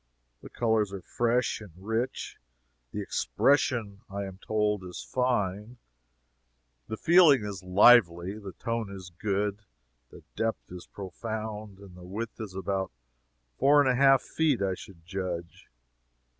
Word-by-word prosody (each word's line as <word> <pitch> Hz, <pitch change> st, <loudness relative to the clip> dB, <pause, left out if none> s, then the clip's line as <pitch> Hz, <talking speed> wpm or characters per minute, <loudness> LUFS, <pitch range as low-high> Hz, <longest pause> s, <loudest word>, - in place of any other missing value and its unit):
The -, -, -11 dB
colors 110 Hz, -3 st, +1 dB
are 95 Hz, -2 st, -6 dB
fresh 120 Hz, 0 st, 0 dB
and 100 Hz, -6 st, -12 dB
rich, 115 Hz, +6 st, -3 dB, 0.5 s
the -, -, -3 dB
"expression," 105 Hz, -, +1 dB
I 100 Hz, +1 st, -4 dB
am 95 Hz, -1 st, -9 dB
told, 105 Hz, -2 st, 0 dB
is 90 Hz, -1 st, -7 dB
fine, 115 Hz, -3 st, -1 dB, 1.1 s
the 110 Hz, -, -4 dB
"feeling" 160 Hz, -, +6 dB
is 100 Hz, -3 st, -5 dB
lively, 95 Hz, -1 st, +5 dB
the 100 Hz, -3 st, -8 dB
"tone" 115 Hz, +1 st, -3 dB
is 95 Hz, -2 st, -9 dB
good, 100 Hz, -1 st, -1 dB, 0.5 s
the -, -, -14 dB
"depth" 115 Hz, -4 st, -2 dB
is 90 Hz, -1 st, -9 dB
profound, 105 Hz, +1 st, -6 dB
and 95 Hz, -2 st, -14 dB
the 90 Hz, -, -12 dB
width 110 Hz, +6 st, -6 dB
is 100 Hz, -4 st, -7 dB
about 95 Hz, 0 st, -2 dB, 0.7 s
four 145 Hz, +2 st, +6 dB
and 145 Hz, -, +4 dB
a 130 Hz, -, +4 dB
half 135 Hz, 0 st, +5 dB
feet, 155 Hz, -6 st, +1 dB
I 95 Hz, -1 st, +1 dB
should 90 Hz, -2 st, -12 dB
judge. 90 Hz, -2 st, -5 dB
105 Hz, 140 wpm, -28 LUFS, 95-115 Hz, 1.1 s, feeling